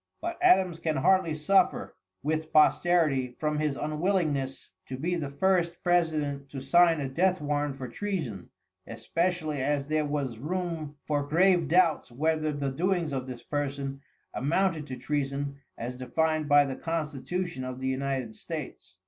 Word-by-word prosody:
But 340 +1 -4
Adams 190 - +4
can 160 -2 -1
hardly 165 +3 +3
suffer 190 +6 +2 0.3
with 155 +1 -1
posterity 155 -5 +3
from 150 -1 -1
his 150 -2 0
unwillingness 155 -4 -1 0.2
to 130 - -5
be 170 +7 -1
the 155 -5 -2
first 175 +3 +1
president 155 -5 +1
to 135 - -6
sign 165 +4 +4
a 140 - -2
death 180 +7 +1
warrant 145 -1 -1
for 130 -2 -6
treason, 145 - -4 0.4
especially 165 -4 -1
as 140 +1 0
there 155 0 0
was 140 -6 -2
room 165 -1 -3
for 145 -1 -1
grave 175 +1 +4
doubts 165 -4 +3
whether 155 +4 0
the 140 -2 -2
doings 170 0 0
of 130 -1 -3
this 120 -2 -7
person 140 -1 -3 0.3
amounted 160 +2 0
to 130 - -5
treason 140 +1 -2 0.2
as 125 +2 -5
defined 155 +3 0
by 145 0 +6
the 135 -1 -4
constitution 165 0 -3
of 130 0 -5
the 130 - -2
United 130 -3 -2
States. 130 - -7
150 Hz, 150 wpm, -28 LUFS, 135-170 Hz, 0.4 s, by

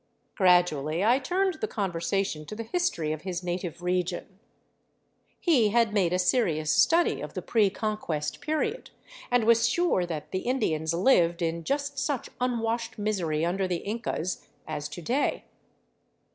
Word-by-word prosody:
Grad 180 -3 +5
ually 155 +6 -2
I 250 +3 +5
turned 365 +3 0
the 435 - 0
conversation 190 - -2
to - - -6
the 230 - -4
history 225 - -1
of 155 -1 -4
his 180 -1 -4
native 175 -1 -4
region. 180 +1 -2 1.0
He 260 - +3
had 230 0 +2
made 190 -5 +2
a 180 - +2
serious 180 -6 +2
study 340 +1 +3
of - - -7
the - - -3
pre 215 -4 +3
Conquest 195 -8 -3
period, 315 +11 -2 0.4
and 245 -2 +3
was 230 +1 +4
sure 295 - +1
that 155 -3 -5
the 185 - -1
Indians 170 -10 0
lived 175 -4 +3
in 165 0 -1
just 285 - -2
such 285 -5 -2
unwashed 235 -2 -1
misery 175 -7 0
under 190 +2 0
the 175 -2 -2
Incas, 205 -5 -3 0.2
as 150 -2 -4
to 155 +4 -8
day. 260 - 0
195 Hz, 155 wpm, -27 LUFS, 170-240 Hz, 1.0 s, Grad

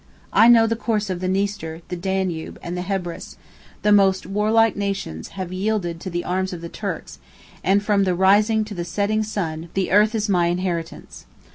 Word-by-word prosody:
I 225 - +7
know 230 -1 +7
the 225 0 0
course 215 -3 -1
of 180 - -3
the 185 - -2
Niester, 190 -4 -2
the 180 - -3
Danube, 185 -2 -2
and 170 +1 -4
the 180 - -3
Hebrus; 180 -2 -4 0.5
the 210 - +3
most 195 -2 +4
warlike 215 +3 +2
nations 195 - -3
have 185 -1 -4
yielded 185 -3 -1
to 185 - -6
the 175 0 -3
arms 185 +1 -1
of 170 - -7
the 170 - -6
Turks; - - -6 0.4
and 200 +2 +3
from 205 -1 +2
the 185 -2 +1
rising 210 +4 +4
to 210 - -8
the 175 -3 -4
setting 205 +5 0
sun, 170 -6 -4
the 190 -1 0
earth 210 +3 +4
is 215 0 0
my 175 -4 +2
inheritance." 175 -2 -4
190 Hz, 190 wpm, -22 LUFS, 175-210 Hz, 0.5 s, I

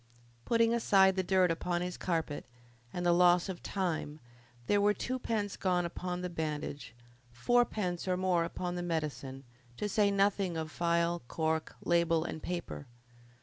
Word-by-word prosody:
Putting 230 0 +3
aside 195 -5 +4
the 190 - +1
dirt 185 -1 +3
upon 175 +1 -1
his 180 0 -4
carpet 160 -6 -2 0.4
and 175 0 -3
the 175 - +5
loss 175 +1 +4
of 180 -2 -5
time, 165 -5 -3 0.5
there 205 +9 +3
were 205 +1 +3
twopence 225 -5 -2
gone 180 -2 +1
upon 180 +1 -4
the 180 - -2
bandage, 150 -6 -4 0.4
fourpence 190 - 0
or 180 -1 +1
more 180 -2 +2
upon 175 +1 -4
the 175 - -3
medicine, 150 -5 -3 0.3
to 210 - -2
say 205 0 +3
nothing 195 -3 +1
of 160 -1 -4
phial, 170 0 +1
cork, 160 +1 -1
label, 170 -1 +2
and 160 -2 -5
paper. 175 -5 -5
175 Hz, 150 wpm, -32 LUFS, 165-190 Hz, 0.5 s, the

